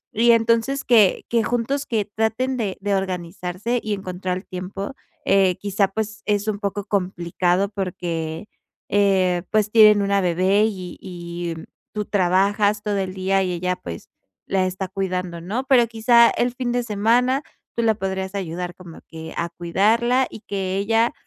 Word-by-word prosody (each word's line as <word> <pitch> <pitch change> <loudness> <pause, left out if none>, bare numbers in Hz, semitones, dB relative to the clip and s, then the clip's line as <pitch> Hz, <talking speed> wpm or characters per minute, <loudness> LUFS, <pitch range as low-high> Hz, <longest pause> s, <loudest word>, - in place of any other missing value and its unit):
Y 235 +2 +5
entonces, 230 +4 +2
que 220 -6 +4
que 230 -1 +2
juntos, 245 +5 -1
que 220 -4 -1
traten 225 +5 -1
de 205 -6 -2
de 200 0 0
organizarse 185 +4 -3
y 215 - -1
encontrar 185 -1 -3
tiempo. 195 +4 -6 0.3
Eh, 195 -2 +4
quizá, 200 0 +1
pues, 215 +1 -4
es 205 0 0
un 215 -2 0
poco 200 -1 -3
complicado 180 -1 0
porque, 175 -3 -4 0.4
eh, 190 -3 +2
pues, 215 -1 +2
tienen 215 -2 +7
una 200 0 +2
bebé 185 +3 +2
y 185 -5 -5
y, 175 -2 -6
mm, 160 - -8 0.3
tú 210 -1 -2
trabajas 205 +2 +2
todo 205 -1 -1
el 190 -1 -2
día 190 +1 +1
y 185 - -1
ella, 180 +1 -1
pues, 85 - -9 0.4
la 190 -1 +1
está 185 +1 -3
cuidando, 185 -2 -3
¿no? 210 +9 -3
Pero, 260 -3 +5
quizá, 235 +1 +5
el 245 0 0
fin 250 -1 -2
de 245 0 +1
semana 240 +5 +2 0.3
tú 235 - 0
la 225 -1 +4
podrías 190 -1 -3
ayudar 180 -1 -4
como 175 -3 -12
que 160 0 -9
a 170 - -1
cuidarla 225 +10 +2
y - - -10
que 190 -1 -2
ella, 225 +4 +2
200 Hz, 165 wpm, -22 LUFS, 185-220 Hz, 0.4 s, tienen